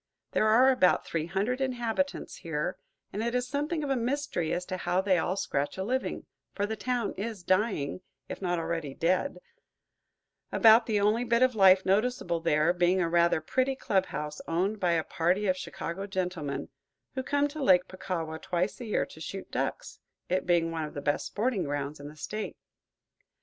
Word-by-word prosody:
There 215 - +2
are 250 +5 +6
about 185 -9 +3
three 165 -1 -2
hundred 205 +9 -1
inhabitants 255 +1 -2
there, 150 -3 -2 0.4
and 205 - -2
it 235 +2 -1
is 250 0 0
something 295 +4 -2
of 280 - -2
a - - +3
mystery 245 - -1
as 180 - -1
to 185 0 -4
how 180 0 0
they 190 -2 +3
all 180 +3 0
scratch 145 -6 -2
a 190 - -2
living; 255 +6 -2 0.3
for 205 - 0
the 220 +1 -3
town 245 -1 -1
is 210 -2 -4
dying, 185 -5 0 0.3
if - - -7
not 175 -2 0
already 165 -4 -3
dead, 185 +12 +1 1.1
about 225 0 +6
the 215 -3 +2
only 210 +4 +2
bit 235 0 +3
of 255 -1 +3
life 190 -3 +6
noticeable 195 -4 +1
there 165 0 +2
being 180 +1 +2
a 175 - +2
rather 170 -1 +3
pretty 260 +11 0
club 195 -7 +1
house 150 0 -5
owned 190 +6 0
by 175 -3 +2
a 165 -1 +1
party 180 +7 0
of 185 -2 +2
Chicago 185 +1 -5
gentlemen, 180 -7 -3 0.4
who 260 - -2
come 285 +2 +1
to 305 +1 -7
Lake 185 -8 +5
Puckawa 165 -4 -4
twice 180 +1 -1
a - - -5
year 215 - 0
to 160 - -14
shoot 195 +4 -6
ducks, - - -3 0.3
it 185 +1 0
being 170 -2 +3
one 165 -1 -2
of 150 - -10
the 145 - -4
best 145 - 0
sporting 220 -2 0
grounds 145 +1 -3
in 145 - -8
the 150 - -11
State. 215 +8 -5
190 Hz, 190 wpm, -29 LUFS, 170-235 Hz, 1.1 s, are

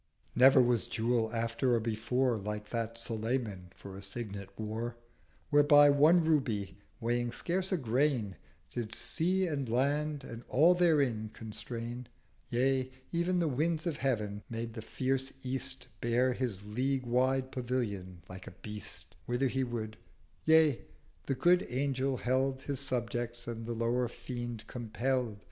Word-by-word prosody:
Never 130 +2 +7
was 120 -2 +1
Jewel 115 -1 0
after 115 +2 +1
or - - +2
before 115 +3 0
380 105 -1 -6
Like 105 0 -5
that 115 -1 -2
Sulayman 110 -5 -3
for 95 -1 -10
a 100 - -8
Signet 100 -1 -5
wore: 110 +2 -3 0.6
Whereby 145 0 +7
one 155 +5 +5
Ruby, 115 -11 0 0.2
weighing 120 +1 0
scarce 185 +9 -2
a 185 - +2
grain 125 - +1 0.4
Did 115 -2 -3
Sea 185 +3 +1
and 140 -7 -2
Land 145 +4 +1
and 115 -2 -8
all 160 +7 +6
therein 140 -11 +2
constrain, 115 +2 -6 0.4
Yea, 130 +1 +1 0.2
ev'n 170 +2 +1
the 170 -2 +2
Winds 155 +3 0
of 165 -4 -1
Heav'n—made 115 -2 -2
the 110 - -6
fierce 135 +3 -1
East 130 0 -2
Bear 125 +2 +2
his 115 -6 -3
League 130 +5 -1
wide 130 +2 +1
Pavilion 105 -8 -3
like 95 0 -9
a - - -7
Beast, 105 -1 -5
Whither 125 +2 +1
he 135 +1 0
would: 110 -3 -4 0.5
yea, 160 -4 +5 0.5
the 135 - +1
Good 180 +6 +4
Angel 135 +1 0
held 130 +2 0
His 140 -2 -2
subject, 120 -3 -2
and 115 -1 -5
the 120 - -2
lower 120 +2 +1
Fiend 120 -2 -6
compell'd. 120 0 -2
125 Hz, 145 wpm, -32 LUFS, 115-135 Hz, 0.6 s, Never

